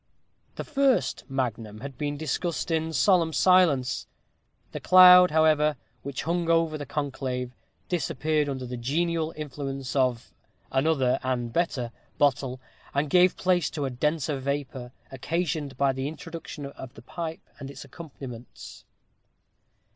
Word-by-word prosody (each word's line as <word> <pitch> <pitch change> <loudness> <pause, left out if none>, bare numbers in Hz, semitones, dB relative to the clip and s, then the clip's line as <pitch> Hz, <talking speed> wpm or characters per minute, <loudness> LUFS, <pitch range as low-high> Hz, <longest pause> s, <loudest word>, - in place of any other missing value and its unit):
The - - -4
first 275 -4 +1
magnum 115 -5 -3
had 140 0 -7
been 145 +2 -3
discussed 165 +2 -2
in 160 0 0
solemn 165 +2 +3
silence; 155 -7 +3 0.6
the - - -5
cloud, 180 0 +8
however, 155 -1 +3 0.3
which 140 -1 -5
hung 170 0 -1
over 165 -1 +2
the 145 -2 -6
conclave, 130 -4 -3 0.4
disappeared 155 -2 0
under 130 -2 -4
the 125 0 -6
genial 160 +6 -1
influence 135 -3 -5
of 130 -4 0 0.4
"another 135 -2 +2
and 125 -2 -2
a - - -15
better" 135 -9 -1 0.3
bottle, 130 -2 +1 0.4
and 140 +1 0
gave 180 0 +5
place 180 -4 +1
to 145 -2 -3
a 135 - -2
denser 150 +2 -1
vapor, 135 -2 -4 0.2
occasioned 150 0 -3
by 140 -1 +2
the 130 +1 -3
introduction 160 -1 -8
of 130 -2 -10
the 115 - -13
pipe 165 +4 -6
and 135 - -7
its 140 +1 -10
accompaniments. 135 -6 -10
145 Hz, 135 wpm, -26 LUFS, 130-165 Hz, 0.6 s, cloud